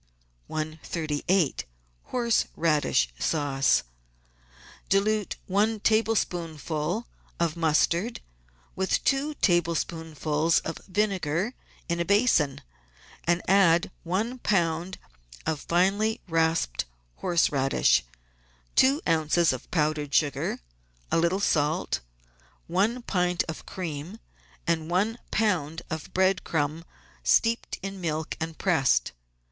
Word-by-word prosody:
138— 155 +1 -1 0.4
HORSE 235 -2 +1
RADISH 150 - +2
SAUCE 140 -3 +2 1.1
Dilute 210 +1 +1
one 210 +3 +1
tablespoonful 175 -4 0 0.3
of 170 -2 +1
mustard 170 +6 +1 0.6
with 190 0 0
two 280 +2 +1
tablespoonfuls 165 - +1
of 165 - -5
vinegar 195 - 0 0.3
in 170 0 -1
a 170 - 0
basin, 200 - +3 0.6
and 175 +1 +2
add 190 -1 +4
one 215 +9 -2
lb. 175 -3 0 0.5
of 160 -2 -1
finely 195 +7 +1
rasped 160 - +1 0.3
horse 170 - +2
radish, 135 -1 +3 0.7
two 270 +3 +5
oz. 160 -1 +3
of 130 - -8
powdered 150 -3 0
sugar, 145 - +1 0.5
a - - +3
little 170 +3 +2
salt, 155 - +1 0.7
one 210 +8 0
pint 180 -4 +1
of 160 - -7
cream, 170 +2 -5 0.5
and 165 -2 0
one 210 +7 +1
lb. 170 -8 0
of 160 -1 -5
bread 190 0 +2
crumb 155 +1 -1 0.4
steeped 230 0 +2
in 195 -1 -5
milk 160 -1 -2
and 160 0 -4
pressed. 135 - +2
170 Hz, 100 wpm, -27 LUFS, 155-195 Hz, 1.1 s, two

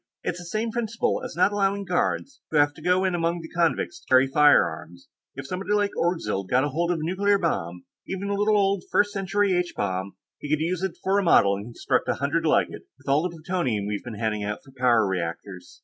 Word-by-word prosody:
"It's 175 - -3
the 175 - -9
same 215 +6 -2
principle 230 -1 -1
as - - -6
not 180 +4 +3
allowing 200 0 0
guards 195 +9 -1
who 155 - 0
have 145 0 +4
to 155 - -14
go 180 +3 +2
in 185 - +1
among 170 0 0
the 160 - -10
convicts 175 - 0
to - - -26
carry 130 +1 +6
firearms. 90 - +2 0.3
If 135 - -7
somebody 185 +7 -3
like 205 -1 +2
Orgzild 105 - -1
got 130 +1 +3
hold 160 +4 -1
of 175 - +1
a 155 - -4
nuclear 200 +4 +2
bomb, 90 - -2 0.2
even 190 +1 -4
a - - 0
little 210 +1 +2
old 195 -2 +1
First 205 0 +3
Century 200 0 0
H 180 -1 -1
bomb, 95 -1 -2 0.2
he 145 - -7
could 155 0 +2
use 170 +3 -1
it 190 -2 -3
for 195 +1 +2
a - - 0
model 100 - +5
and 100 +1 -7
construct 120 - -1
a - - +1
hundred - - 0
like - - +3
it, - - -11
with - - -23
all 140 +2 +3
the 180 - -1
plutonium 160 - -2
we've 105 0 -3
been 120 -4 -7
handing 105 -2 -1
out 105 +1 -4
for 135 - -17
power 120 -4 +3
reactors. 90 0 -5
165 Hz, 230 wpm, -25 LUFS, 115-195 Hz, 0.3 s, carry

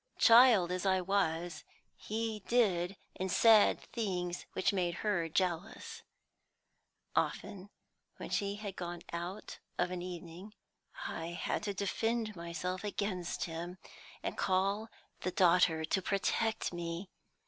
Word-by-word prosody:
Child 230 -7 +7
as 180 0 -2
I 190 -1 +3
was, 175 -4 0 0.3
he 220 0 -3
did 195 -6 +2 0.2
and 190 0 -2
said 220 0 +6
things 180 -6 -2
which 185 - +1
made 175 -3 0
her 175 -6 +1
jealous. 180 +4 -2 1.1
Often 195 0 -1 0.5
when - - -7
she 200 -1 0
had 205 -2 -6
gone 175 -1 -5
out 175 +5 -5 0.2
of 180 - +1
an 180 -1 -3
evening, 180 +3 -8 0.5
I 170 +1 -5
had - - -1
to 200 -1 -2
defend 220 +3 -1
myself 170 +2 -4
against 200 -4 -2
him, 170 +2 -5 0.5
and - - -2
call 195 +4 +1 0.3
the - - -2
daughter 175 -3 +4
to 190 +4 0
protect 215 +2 0
me. 175 +2 -5
185 Hz, 125 wpm, -33 LUFS, 175-205 Hz, 1.1 s, Child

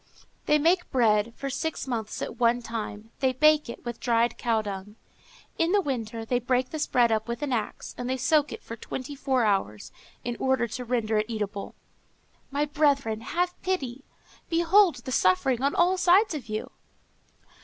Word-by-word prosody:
They 300 - +5
make 345 +4 +2
bread 225 -3 +3
for 275 -1 -4
six 315 +4 -3
months 230 -5 -3
at - - -6
one 240 0 +3
time; 225 -1 -6
they 260 -1 +2
bake 305 +1 +4
it 235 - -9
with 240 -1 -5
dried 235 -1 +2
cow 225 -3 0
dung. 200 0 -6 0.6
In 330 +3 +2
the 410 - +5
winter 230 - -3
they 245 +2 +1
break 250 +1 0
this 310 -2 -2
bread 240 -2 +3
up 220 0 0
with 235 +5 -4
an 275 -3 -1
axe, 220 -3 -3
and 245 0 -3
they 260 - 0
soak 295 +3 +2
it - - -8
for 230 - -7
twenty 260 +4 -6
four 265 -4 +1
hours, 195 - -1 0.3
in 240 0 -3
order 260 -3 +1
to 250 +3 -5
render 225 -3 0
it 215 +2 -2
eatable. 210 -2 -4 0.7
My 285 +1 0
brethren, 280 -7 +1
have 355 +8 -1
pity! 275 -9 -2 0.5
behold 345 +2 +4
the 260 - -4
suffering 230 +4 +2
on 280 +1 +1
all 365 +2 +3
sides 375 +3 +4
of 270 -8 -6
you!" 215 0 -4
250 Hz, 180 wpm, -27 LUFS, 225-295 Hz, 0.7 s, They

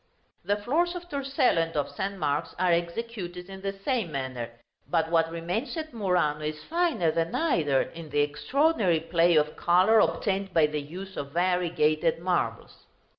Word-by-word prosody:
The 205 - +1
floors 325 - 0
of 350 0 -7
Torcello 275 - +1
and 165 -1 -3
of 145 - -1
St. 195 +1 -4
Mark's 150 -1 -1
are 180 0 +2
executed 180 +1 -3
in 190 0 -9
the 195 0 -2
same 235 - 0
manner; 130 -4 -4 0.4
but 165 -1 +1
what 165 -1 +3
remains 175 - -3
at 315 -3 -5
Murano 180 -8 +1
is 155 0 -4
finer 320 - +1
than 165 +1 -1
either, 155 - +2
in 165 -2 -10
the 145 0 +2
extraordinary 185 - +2
play 165 +1 +3
of 150 0 +2
color 185 +6 +4
obtained 195 -3 0
by 160 -2 +6
the 150 0 -2
use 185 +6 -9
of 140 0 -5
variegated 175 -3 +1
marbles. 175 +1 -2
175 Hz, 165 wpm, -27 LUFS, 155-210 Hz, 0.4 s, by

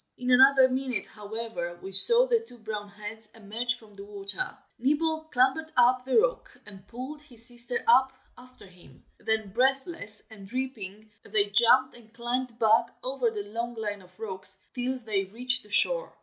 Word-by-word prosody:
In 250 0 -3
another 265 +1 +6
minute, 255 -5 -1
however, 210 -5 -7
we 190 - -10
saw 470 - +7
the 480 -2 +1
two 445 - -16
brown 215 -2 -7
heads 210 +2 -9
emerge 225 +3 -3
from 215 -2 -19
the 200 0 -11
water; 205 - -6 0.2
Nibble 315 +5 -1
clambered 315 +3 0
up 250 +1 +3
the 265 - 0
rock, - - -1
and 195 -2 -5
pulled 260 +7 -9
his 240 -6 0
sister 240 0 +1
up 260 +3 +4 0.2
after 255 -2 -17
him; 175 -8 -20
then 220 -2 -1
breathless 265 - +2
and 200 -3 -12
dripping, 215 -4 -7
they 205 -1 +2
jumped 245 +5 +4
and 225 -2 -17
climbed 240 0 -4
back 225 0 +3 0.2
over 255 -2 -1
the 210 -2 -6
long 230 +3 -6
line 205 -3 -5
of 180 +2 -22
rocks, 190 -3 +1 0.2
till 255 +1 -3
they 215 -5 -2
reached 245 +5 0
the 210 - -20
shore. - - +5
235 Hz, 170 wpm, -26 LUFS, 210-260 Hz, 0.2 s, saw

